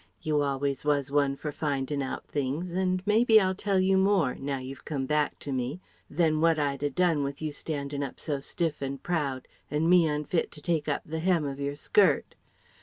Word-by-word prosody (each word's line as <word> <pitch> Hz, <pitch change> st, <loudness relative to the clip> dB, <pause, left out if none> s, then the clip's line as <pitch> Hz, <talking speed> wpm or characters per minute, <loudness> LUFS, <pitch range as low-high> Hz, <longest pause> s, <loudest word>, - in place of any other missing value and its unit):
You 150 Hz, -1 st, +1 dB
always 140 Hz, -1 st, -1 dB
was 145 Hz, -2 st, +1 dB
one 140 Hz, -1 st, +2 dB
for 150 Hz, +2 st, -5 dB
findin' 140 Hz, -1 st, -2 dB
out 135 Hz, -, -4 dB
things, 145 Hz, +5 st, -2 dB
and 185 Hz, 0 st, 0 dB
maybe 220 Hz, +1 st, +6 dB
I'll 190 Hz, -2 st, +1 dB
tell 195 Hz, 0 st, 0 dB
you 190 Hz, 0 st, +3 dB
more, 190 Hz, -9 st, +3 dB
now 135 Hz, 0 st, -3 dB
you've 130 Hz, +1 st, -8 dB
come 140 Hz, -4 st, -3 dB
back 150 Hz, +1 st, 0 dB
to 140 Hz, -, -5 dB
me, 130 Hz, +5 st, -2 dB, 0.3 s
than 155 Hz, -1 st, +1 dB
what 165 Hz, -1 st, +4 dB
I'd 140 Hz, -2 st, -1 dB
a 145 Hz, -, +1 dB
done 165 Hz, 0 st, +2 dB
with 140 Hz, 0 st, -3 dB
you 155 Hz, -1 st, -3 dB
standing 145 Hz, -1 st, -4 dB
up 140 Hz, -2 st, -5 dB
so 145 Hz, -3 st, -2 dB
stiff 160 Hz, +2 st, -3 dB
and 135 Hz, 0 st, -4 dB
proud 145 Hz, -7 st, -2 dB, 0.2 s
and 155 Hz, +2 st, 0 dB
me 175 Hz, -2 st, +6 dB
unfit 150 Hz, +3 st, -1 dB
to 150 Hz, -, -11 dB
take 160 Hz, -2 st, -1 dB
up 145 Hz, -, -1 dB
the 160 Hz, +1 st, -4 dB
hem 170 Hz, -2 st, +2 dB
of 140 Hz, 0 st, -4 dB
your 140 Hz, 0 st, -2 dB
skirt.... 425 Hz, -, +2 dB
150 Hz, 205 wpm, -28 LUFS, 140-170 Hz, 0.3 s, maybe